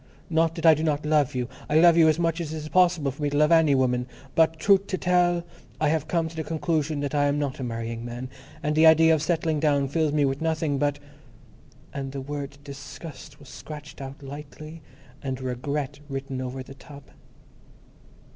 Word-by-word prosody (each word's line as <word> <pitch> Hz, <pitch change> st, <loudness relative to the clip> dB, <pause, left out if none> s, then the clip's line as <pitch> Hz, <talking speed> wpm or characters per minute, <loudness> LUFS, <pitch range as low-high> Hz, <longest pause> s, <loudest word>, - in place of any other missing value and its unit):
Not 165 Hz, 0 st, +2 dB
that 165 Hz, -, -4 dB
I 160 Hz, -, +9 dB
do 155 Hz, -, -2 dB
not 150 Hz, -1 st, 0 dB
love 150 Hz, -4 st, +2 dB
you. 125 Hz, -1 st, -1 dB, 0.2 s
I 155 Hz, +1 st, +4 dB
love 170 Hz, 0 st, +7 dB
you 165 Hz, -2 st, +6 dB
as 155 Hz, -, +2 dB
much 165 Hz, 0 st, 0 dB
as 155 Hz, -2 st, -5 dB
it 160 Hz, -, -4 dB
is 155 Hz, 0 st, -6 dB
possible 175 Hz, -6 st, +3 dB
for 140 Hz, -, -12 dB
me 145 Hz, -, +1 dB
to 145 Hz, -, -1 dB
love 150 Hz, +2 st, +4 dB
any 160 Hz, -4 st, +5 dB
woman, 125 Hz, -1 st, +1 dB, 0.3 s
but, 160 Hz, 0 st, +3 dB
truth 195 Hz, +4 st, +3 dB
to 185 Hz, -, -2 dB
tell, 175 Hz, -1 st, +2 dB, 0.4 s
I 155 Hz, -, +2 dB
have 155 Hz, -1 st, 0 dB
come 165 Hz, -2 st, 0 dB
to 165 Hz, -, -10 dB
the 160 Hz, -, -3 dB
conclusion 155 Hz, -1 st, -1 dB
that 145 Hz, 0 st, -3 dB
I 145 Hz, -1 st, +2 dB
am 145 Hz, 0 st, +1 dB
not 140 Hz, -2 st, -2 dB
a -, -, -3 dB
marrying 115 Hz, -1 st, -4 dB
man, 120 Hz, +2 st, -6 dB, 0.4 s
and 150 Hz, 0 st, 0 dB
the 160 Hz, +1 st, +6 dB
idea 160 Hz, 0 st, +6 dB
of 155 Hz, -, +1 dB
settling 160 Hz, -2 st, 0 dB
down 145 Hz, -2 st, +2 dB
fills 155 Hz, +2 st, 0 dB
me 145 Hz, -1 st, +2 dB
with 135 Hz, +1 st, -2 dB
nothing 160 Hz, -3 st, 0 dB
but—" 145 Hz, 0 st, +1 dB, 1.0 s
and 135 Hz, -1 st, -5 dB
the 140 Hz, -, -4 dB
word 140 Hz, 0 st, -6 dB
"disgust" 145 Hz, +1 st, -10 dB
was 140 Hz, -2 st, -14 dB
scratched 150 Hz, 0 st, -10 dB
out 135 Hz, +2 st, -8 dB
lightly 150 Hz, +3 st, -9 dB, 0.4 s
and 130 Hz, -2 st, -4 dB
"regret" 130 Hz, +3 st, -3 dB
written 135 Hz, -1 st, -4 dB
over 130 Hz, +1 st, -5 dB
the 135 Hz, -, -12 dB
top. 140 Hz, 0 st, -14 dB
150 Hz, 210 wpm, -25 LUFS, 135-160 Hz, 1.0 s, I